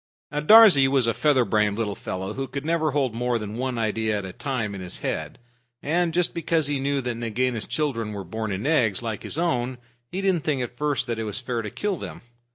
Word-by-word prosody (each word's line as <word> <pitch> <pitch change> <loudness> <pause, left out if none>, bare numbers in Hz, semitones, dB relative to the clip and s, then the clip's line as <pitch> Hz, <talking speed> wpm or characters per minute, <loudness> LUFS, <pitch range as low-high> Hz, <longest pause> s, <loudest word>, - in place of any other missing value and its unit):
Darzee 150 -2 +7
was 135 -2 +3
a 115 - +2
feather 140 -5 +3
brained 105 -2 +1
little 110 -3 -1
fellow 95 0 -5
who 135 0 -4
could 140 +2 -6
never 160 -1 +1
hold 135 -4 0
more 120 +1 0
than 105 -1 -6
one 130 0 -2
idea 110 -1 0
at 100 - -4
a 95 - -7
time 120 -6 -3
in 100 - -6
his 90 -1 -5
head. - - -3 0.5
And 170 +3 +1
just 175 +1 +1
because 165 -1 +1
he 145 -1 0
knew 140 0 0
that 125 -1 -2
Nagaina's 115 0 -2
children 120 -8 -1
were 100 -2 -5
born 110 +4 -4
in 95 +4 -3
eggs 120 - +2
like 110 -3 -3
his - - 0
own, 130 -7 0 0.3
he 185 - -3
didn't 190 -5 +1
think 140 -5 0
at 120 0 -7
first 145 +1 0
that 115 -1 -3
it - - -1
was 105 -2 -4
fair 120 -2 -3
to 105 - -5
kill 205 - -2
them. - - -8
125 Hz, 230 wpm, -25 LUFS, 110-150 Hz, 0.5 s, Darzee